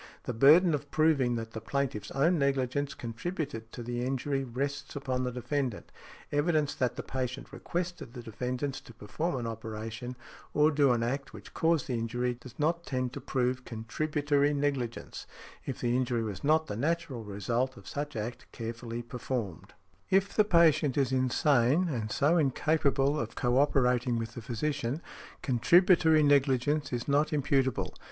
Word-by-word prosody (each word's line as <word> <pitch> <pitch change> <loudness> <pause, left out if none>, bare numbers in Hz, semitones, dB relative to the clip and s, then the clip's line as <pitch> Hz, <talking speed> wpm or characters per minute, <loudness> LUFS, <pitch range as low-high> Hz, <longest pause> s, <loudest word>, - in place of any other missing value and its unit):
The 125 - -3
burden 155 +9 +6
of 145 -1 -3
proving 145 -6 +3
that 115 -1 -5
the 110 - -6
plaintiff's 130 -7 -2
own 160 +5 +2
negligence 140 0 0
contributed 120 -1 -5
to 120 - -7
the 120 +1 -3
injury 135 +1 -1
rests 135 +3 -4
upon 130 -2 -2
the 125 - -1
defendant. 125 -1 -3 0.4
Evidence 150 0 +1
that 125 -1 -1
the - - -5
patient 130 0 -4
requested 175 -8 -4
the 120 -2 -8
defendant 125 +5 -3
to 120 -3 -10
perform 135 +12 -3
an 120 -2 -3
operation, 115 +2 -5 0.4
or 150 +1 +5
do 140 -3 +4
an 120 -1 +1
act, 135 +4 -3
which - - -12
caused 165 -3 +2
the 130 - -3
injury, 120 +2 -1
does 120 0 -13
not 165 +3 0
tend 130 -4 -2
to - - -6
prove 125 0 -1
contributory 145 +5 0
negligence, 140 -5 -3 0.4
if 135 - -4
the 120 0 +1
injury 125 -2 0
was 105 -4 -5
not 155 +2 +3
the 120 - -5
natural 145 -1 -1
result 115 +6 -2
of 100 - -13
such 145 0 -4
act 115 +2 -5
carefully 115 0 -5
performed. 120 - -5 0.4
If 195 +1 +2
the 215 - +5
patient 155 - +4
is 135 -2 +2
insane, 130 +4 +3
and 115 -7 -2
so 155 +9 +3
incapable 145 -1 +2
of 115 -1 -4
co 125 +1 +2
operating 125 -3 +2
with 115 0 -3
the 120 - -7
physician, 125 +2 -2 0.4
contributory 160 +5 +5
negligence 145 +1 +2
is 120 -1 -3
not 145 +2 +2
imputable. 135 -4 +1
130 Hz, 160 wpm, -30 LUFS, 120-145 Hz, 0.4 s, burden